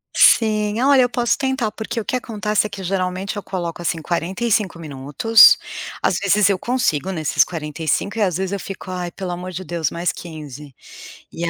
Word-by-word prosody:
Sim. 215 Hz, -1 st, +4 dB
Olha, 275 Hz, -1 st, +5 dB
eu 245 Hz, -, +2 dB
posso 240 Hz, -2 st, 0 dB
tentar, 265 Hz, -5 st, -1 dB
porque 220 Hz, +1 st, -5 dB
o 215 Hz, -, -5 dB
que -, -, -2 dB
acontece 210 Hz, -3 st, -1 dB
é -, -, -16 dB
que 195 Hz, -1 st, -8 dB
geralmente 185 Hz, +2 st, -2 dB
eu 205 Hz, -, -4 dB
coloco, 175 Hz, -2 st, -5 dB
assim, 165 Hz, -1 st, -1 dB
45 190 Hz, +4 st, -1 dB
minutos, 150 Hz, +8 st, +5 dB, 0.5 s
às 180 Hz, -, +2 dB
vezes 200 Hz, 0 st, +3 dB
eu 190 Hz, -2 st, +1 dB
consigo 190 Hz, -, 0 dB
nesses 155 Hz, -5 st, +2 dB
45, 160 Hz, +4 st, -3 dB
e 220 Hz, -, 0 dB
às 185 Hz, -4 st, +1 dB
vezes 190 Hz, 0 st, -3 dB
eu 200 Hz, -, -2 dB
fico: 190 Hz, 0 st, -8 dB
"Ai, 180 Hz, -1 st, -3 dB
pelo 185 Hz, -1 st, -5 dB
amor 180 Hz, +1 st, -5 dB
de 185 Hz, +1 st, -6 dB
Deus, 170 Hz, -5 st, -2 dB
mais 175 Hz, +1 st, -1 dB
15", 150 Hz, -5 st, -10 dB, 0.6 s
e 170 Hz, 0 st, -3 dB
185 Hz, 190 wpm, -20 LUFS, 170-215 Hz, 0.6 s, Olha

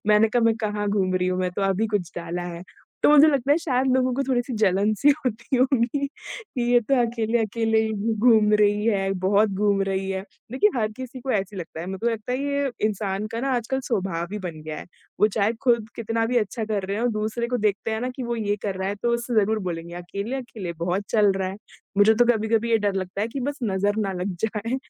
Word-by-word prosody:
मैंने 210 Hz, +1 st, +5 dB
कहा, 240 Hz, +2 st, +1 dB
"मैं 225 Hz, 0 st, +4 dB
कहाँ 210 Hz, -2 st, -2 dB
घूम 190 Hz, -2 st, +1 dB
रही 180 Hz, 0 st, +1 dB
हूँ, 185 Hz, 0 st, -1 dB
मैं 180 Hz, -1 st, 0 dB
तो 200 Hz, -, 0 dB
अभी 195 Hz, +3 st, +1 dB
कुछ 175 Hz, -3 st, -5 dB
डाला 170 Hz, +1 st, -4 dB
है।" 170 Hz, -, -8 dB, 0.4 s
तो -, -, +6 dB
मुझे 300 Hz, 0 st, +8 dB
लगता 280 Hz, -2 st, +1 dB
है -, -, +4 dB
शायद 265 Hz, -5 st, 0 dB
लोगों 255 Hz, -1 st, +2 dB
को 275 Hz, -, 0 dB
थोड़ी-सी 250 Hz, -1 st, -1 dB
जलन-सी 210 Hz, +6 st, +3 dB
होती 250 Hz, +2 st, -1 dB
होगी, 255 Hz, +2 st, +2 dB
कि 415 Hz, -, -7 dB
ये 245 Hz, -, +7 dB
तो 255 Hz, +4 st, 0 dB
अकेले-अकेले 225 Hz, -1 st, +1 dB
ही 220 Hz, 0 st, 0 dB
घू 215 Hz, +2 st, -1 dB, 0.2 s
घूम 215 Hz, -2 st, +5 dB
रही 205 Hz, +1 st, +3 dB
है, 195 Hz, -3 st, +1 dB
बहुत 205 Hz, +2 st, +4 dB
घूम 200 Hz, 0 st, +1 dB
रही 195 Hz, 0 st, -1 dB
है। 190 Hz, 0 st, -2 dB, 0.3 s
देखिए, 415 Hz, +12 st, +3 dB
हर 215 Hz, -1 st, 0 dB
किसी 255 Hz, +2 st, -8 dB
को 265 Hz, -, -4 dB
ऐसा 195 Hz, -5 st, 0 dB
ही -, -, -6 dB
लगता 165 Hz, -2 st, -7 dB
है। 170 Hz, -, -6 dB
मेको 190 Hz, +4 st, -4 dB
लगता 225 Hz, +2 st, -4 dB
है 255 Hz, -, 0 dB
ये 280 Hz, -1 st, 0 dB, 0.2 s
इंसान 200 Hz, -1 st, -2 dB
का 230 Hz, -, -2 dB
ना 270 Hz, +2 st, -1 dB
आजकल 245 Hz, +3 st, -2 dB
स्वभाव 185 Hz, -5 st, -2 dB
ही 210 Hz, -, -3 dB
बन 170 Hz, -5 st, -6 dB
गया 155 Hz, 0 st, -6 dB
है। -, -, -9 dB, 0.3 s
वो 210 Hz, -, +7 dB
चाहे 210 Hz, +1 st, +2 dB
खुद 235 Hz, -4 st, +2 dB
कितना 225 Hz, 0 st, -1 dB
भी 245 Hz, +1 st, -1 dB
अच्छा 220 Hz, +1 st, -2 dB
कर 210 Hz, -2 st, -2 dB
रहे 200 Hz, +2 st, -2 dB
हों, 240 Hz, +1 st, +1 dB
दूसरे 220 Hz, +3 st, -2 dB
को 250 Hz, -, 0 dB
देखते 205 Hz, +2 st, -1 dB
हैं 220 Hz, 0 st, -2 dB
ना 250 Hz, -, -2 dB
कि 260 Hz, -, -4 dB
वो 235 Hz, 0 st, -2 dB
ये 205 Hz, -2 st, -1 dB
कर 200 Hz, -2 st, -2 dB
रहा 190 Hz, 0 st, -2 dB
है 200 Hz, -, -2 dB
तो 240 Hz, -, +2 dB
उससे 235 Hz, 0 st, -3 dB
ज़रूर 215 Hz, +2 st, +1 dB
बोलेंगे, 170 Hz, 0 st, -5 dB
"अकेले-अकेले 200 Hz, +2 st, -5 dB
बहुत 185 Hz, +3 st, -1 dB
चल 210 Hz, -3 st, +4 dB
रहा 190 Hz, -1 st, -1 dB
है।" 190 Hz, -, -6 dB, 0.4 s
मुझे 215 Hz, +2 st, +6 dB
तो 240 Hz, +2 st, +4 dB
कभी-कभी 225 Hz, +1 st, 0 dB
ये 225 Hz, -, +4 dB
डर 205 Hz, -1 st, 0 dB
लगता 190 Hz, +1 st, -3 dB
है 215 Hz, -, 0 dB
कि 270 Hz, +4 st, -5 dB
बस 285 Hz, +3 st, -3 dB
नज़र 205 Hz, 0 st, 0 dB
ना 195 Hz, -, -2 dB
लग 190 Hz, -1 st, -3 dB
जाए। 225 Hz, +3 st, -2 dB
215 Hz, 240 wpm, -24 LUFS, 195-240 Hz, 0.4 s, मुझे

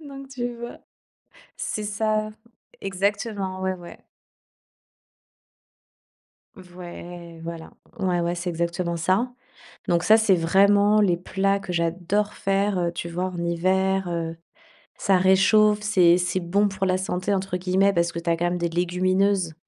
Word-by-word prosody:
Donc, 275 Hz, -3 st, -10 dB
tu 245 Hz, -2 st, -4 dB
vois, 240 Hz, +1 st, -8 dB, 0.8 s
c'est 215 Hz, -, -4 dB
ça, 215 Hz, +1 st, -1 dB, 0.5 s
exactement, 195 Hz, 0 st, -2 dB
ouais, 190 Hz, 0 st, 0 dB
ouais. 175 Hz, -1 st, -12 dB, 2.6 s
V 180 Hz, -2 st, -14 dB
ouais, 175 Hz, -1 st, -9 dB
voilà, 165 Hz, -1 st, -7 dB, 0.3 s
ouais, 180 Hz, -3 st, 0 dB
ouais, 170 Hz, +1 st, -1 dB
c'est 175 Hz, +1 st, -4 dB
exactement 170 Hz, 0 st, -2 dB
ça. 190 Hz, +9 st, 0 dB, 0.5 s
Donc 170 Hz, 0 st, +1 dB
ça, 215 Hz, +5 st, +6 dB
c'est 220 Hz, -4 st, +3 dB
vraiment 200 Hz, +5 st, +4 dB
les 180 Hz, -4 st, +3 dB
plats 195 Hz, +2 st, 0 dB
que 190 Hz, -2 st, -6 dB
j'adore 175 Hz, +5 st, -1 dB
faire, 195 Hz, +1 st, 0 dB
heu. 170 Hz, 0 st, -1 dB
Tu 170 Hz, 0 st, -5 dB
vois, 180 Hz, +2 st, -2 dB
en 185 Hz, -1 st, -6 dB
hiver, 185 Hz, +2 st, 0 dB
heu, 165 Hz, -1 st, -3 dB, 0.6 s
ça 195 Hz, -2 st, +3 dB
réchauffe, 210 Hz, +3 st, +4 dB
c'est 180 Hz, -5 st, +4 dB
c'est 180 Hz, +1 st, -1 dB
bon 200 Hz, +4 st, +1 dB
pour 195 Hz, 0 st, -3 dB
la 185 Hz, 0 st, +1 dB
santé, 185 Hz, +1 st, -2 dB
entre 190 Hz, -2 st, -1 dB
guillemets, 190 Hz, +2 st, +2 dB
parce 170 Hz, -1 st, +1 dB
que 170 Hz, -, -5 dB
tu 170 Hz, -, -5 dB
as 165 Hz, -, +3 dB
quand 170 Hz, -, -2 dB
même 180 Hz, -, -2 dB
des 170 Hz, 0 st, -1 dB
légumineuses. 180 Hz, +1 st, +1 dB
185 Hz, 150 wpm, -24 LUFS, 175-200 Hz, 2.6 s, ça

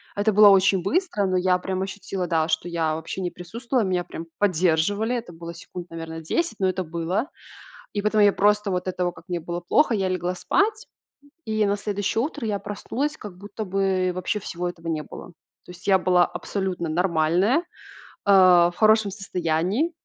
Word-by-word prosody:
Это 205 Hz, +2 st, +2 dB
было 210 Hz, 0 st, +8 dB
очень 195 Hz, -2 st, +4 dB
быстро, 325 Hz, -, 0 dB
но 185 Hz, -1 st, +1 dB
я 180 Hz, 0 st, +3 dB
прям 190 Hz, 0 st, -3 dB
ощутила, 190 Hz, -2 st, -4 dB
да, 160 Hz, -1 st, +1 dB
что 160 Hz, +2 st, -1 dB
я 165 Hz, -2 st, 0 dB
вообще 160 Hz, +4 st, -5 dB
не 180 Hz, -, -2 dB
присутствовала. 230 Hz, +7 st, -2 dB
Меня 180 Hz, -2 st, 0 dB
прям 165 Hz, -1 st, -8 dB
поддерживали. 195 Hz, +4 st, +1 dB
Это 230 Hz, -7 st, -5 dB
было 170 Hz, +1 st, -8 dB
секунд, 175 Hz, +1 st, -9 dB
наверно, 165 Hz, 0 st, -7 dB
10, 335 Hz, -, -2 dB
но 190 Hz, -1 st, +2 dB
это 185 Hz, 0 st, -2 dB
было. 170 Hz, -, -2 dB, 0.7 s
И 205 Hz, -, -1 dB
потом 210 Hz, 0 st, +2 dB
я 205 Hz, -1 st, +6 dB
просто 210 Hz, 0 st, +2 dB
вот 180 Hz, 0 st, -2 dB
этого, 180 Hz, -1 st, -1 dB
как -, -, -15 dB
мне 175 Hz, -1 st, -2 dB
было 170 Hz, +2 st, -5 dB
плохо, 230 Hz, -, +2 dB
я 190 Hz, -2 st, 0 dB
легла 180 Hz, 0 st, -1 dB
спать, 420 Hz, -, 0 dB, 0.6 s
и 215 Hz, -1 st, +1 dB
на 200 Hz, -, +1 dB
следующее 205 Hz, +2 st, -1 dB
утро 295 Hz, -4 st, -4 dB
я 205 Hz, -2 st, -1 dB
проснулась, 255 Hz, +8 st, -3 dB
как 200 Hz, -4 st, -10 dB
будто 205 Hz, +3 st, -7 dB
бы 190 Hz, -1 st, 0 dB
вообще 185 Hz, +3 st, -2 dB
всего 180 Hz, -2 st, -4 dB
этого 170 Hz, -1 st, -9 dB
не 155 Hz, -2 st, -1 dB
было. -, -, -10 dB, 0.4 s
То -, -, -14 dB
есть 180 Hz, -, -11 dB
я 190 Hz, -, +6 dB
была 180 Hz, -1 st, +4 dB
абсолютно 185 Hz, -4 st, -3 dB
нормальная, 175 Hz, -, +2 dB
э, 350 Hz, -, -4 dB, 0.7 s
в 180 Hz, -3 st, +6 dB
хорошем 215 Hz, -2 st, +4 dB
состоянии, 185 Hz, -, -1 dB
185 Hz, 185 wpm, -24 LUFS, 175-210 Hz, 0.7 s, было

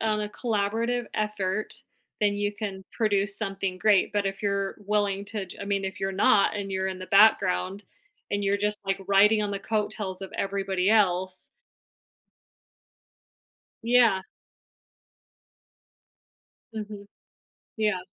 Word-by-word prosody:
on 215 Hz, -1 st, 0 dB
a 210 Hz, -, -3 dB
collaborative 230 Hz, +2 st, -1 dB
effort, 210 Hz, -1 st, -2 dB, 0.4 s
then 205 Hz, -1 st, +2 dB
you 205 Hz, 0 st, -1 dB
can 195 Hz, -2 st, -6 dB
produce 200 Hz, -3 st, +1 dB
something 195 Hz, -3 st, -2 dB
great, 205 Hz, 0 st, +3 dB
but 205 Hz, -1 st, 0 dB
if 195 Hz, +2 st, -4 dB
you're 200 Hz, -1 st, -1 dB
willing 205 Hz, -1 st, 0 dB
to 205 Hz, -3 st, -4 dB
to 185 Hz, -, -9 dB
I -, -, -4 dB
mean, 200 Hz, -1 st, -1 dB
if 190 Hz, +2 st, -5 dB
you're 195 Hz, 0 st, -1 dB
not, 205 Hz, +1 st, +3 dB
and 195 Hz, -1 st, -4 dB
you're 190 Hz, 0 st, -1 dB
in 185 Hz, -1 st, -5 dB
the 185 Hz, -, -7 dB
background, 195 Hz, -1 st, +3 dB, 0.5 s
and 205 Hz, 0 st, -1 dB
you're 200 Hz, 0 st, +2 dB
just 210 Hz, +1 st, -1 dB
like 195 Hz, 0 st, -1 dB
riding 210 Hz, +2 st, +5 dB
on 205 Hz, -, -1 dB
the 200 Hz, -, -2 dB
coattails 205 Hz, -2 st, -2 dB
of 190 Hz, -, -8 dB
everybody 195 Hz, -1 st, 0 dB
else 185 Hz, -3 st, +2 dB, 2.3 s
Yeah. 230 Hz, -5 st, +4 dB, 2.5 s
Mhm. 210 Hz, -2 st, -7 dB, 0.7 s
Yeah. 210 Hz, -4 st, +1 dB
200 Hz, 130 wpm, -26 LUFS, 195-210 Hz, 2.5 s, riding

